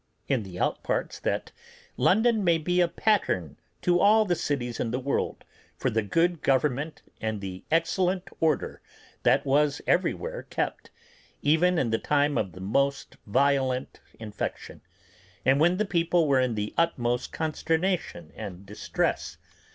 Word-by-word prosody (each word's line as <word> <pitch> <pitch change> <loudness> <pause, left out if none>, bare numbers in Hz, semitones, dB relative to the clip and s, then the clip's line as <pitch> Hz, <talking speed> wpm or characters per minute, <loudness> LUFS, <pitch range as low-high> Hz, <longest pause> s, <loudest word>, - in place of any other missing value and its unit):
in 130 -4 +1
the 95 -3 -8
outparts, - - -1
that - - -2 0.4
London 220 +2 +3
may 170 -2 +4
be 180 +3 +1
a 175 - +4
pattern 95 - 0 0.3
to 175 0 +3
all 215 +3 +5
the 180 - +1
cities 140 -8 -2
in 115 - -1
the 120 - -1
world 135 +2 -2 0.3
for - - 0
the 110 - +1
good 165 - +1
government 140 +3 0 0.2
and 110 -1 -2
the 95 -2 -7
excellent 180 +3 +1
order 155 -3 0 0.4
that - - +3
was 145 +1 +2
everywhere - - 0
kept, - - -4 0.5
even 170 +4 +3
in 120 -7 +1
the 110 - +1
time 145 0 +1
of 100 -6 -1
the 90 - -11
most 140 +8 0
violent 130 +2 +1 0.2
infection, 105 -2 -6 0.6
and 135 +2 +4
when 175 +4 +4
the 215 - +1
people 170 -3 +2
were 135 -2 +4
in 125 -3 +1
the 105 0 -3
utmost 125 -7 0
consternation 160 - -1
and 100 -3 -8
distress. 105 +2 -2
145 Hz, 145 wpm, -27 LUFS, 115-175 Hz, 0.6 s, all